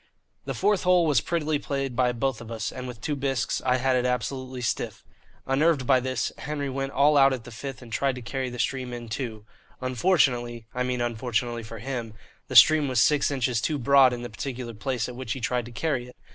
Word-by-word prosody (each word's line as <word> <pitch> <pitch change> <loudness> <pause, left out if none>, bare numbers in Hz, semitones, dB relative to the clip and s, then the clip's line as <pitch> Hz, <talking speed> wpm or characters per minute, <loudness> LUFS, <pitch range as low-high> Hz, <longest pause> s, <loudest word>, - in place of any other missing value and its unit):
The - - -3
fourth 205 -3 +2
hole 180 -2 +4
was 145 -7 +3
prettily 155 -3 -1
played 135 -3 -3
by 125 0 +3
both 125 0 -2
of 115 - -10
us, 110 -1 -3
and 130 0 -6
with 120 -3 -8
two 150 +2 -1
bisques 135 -2 -1
I 125 0 +2
had 130 0 +1
it 125 - +2
absolutely 125 +1 -2
stiff. 120 - -2 0.4
Unnerved 140 0 +2
by 130 0 +5
this, 130 -1 -2
Henry 145 -1 -3
went 135 +1 -3
all 145 +2 +4
out 135 -1 +6
at 125 -3 -5
the 120 - -11
fifth 135 +3 -7
and 115 -2 -11
tried 135 +1 +1
to 125 - -7
carry 130 +1 -3
the 125 - -8
stream 125 +1 -2
in 120 -1 -7
two. 110 -2 -5 0.3
Unfortunately 125 -4 +1
(I 125 - -2
mean 125 -1 -1
unfortunately 120 0 -1
for 115 +1 -9
him) 115 -1 -5 0.3
the - - -6
stream 155 -2 +8
was 130 -3 +1
six 150 +4 +4
inches 125 -4 0
too 150 +6 0
broad 135 0 +5
in 120 0 -5
the 120 - -5
particular 120 +2 -5
place 120 +1 -2
at 125 - -8
which 125 -3 -4
he - - -6
tried 120 0 -1
to - - -10
carry 125 0 -2
it. 125 - -14
130 Hz, 225 wpm, -26 LUFS, 120-135 Hz, 0.4 s, stream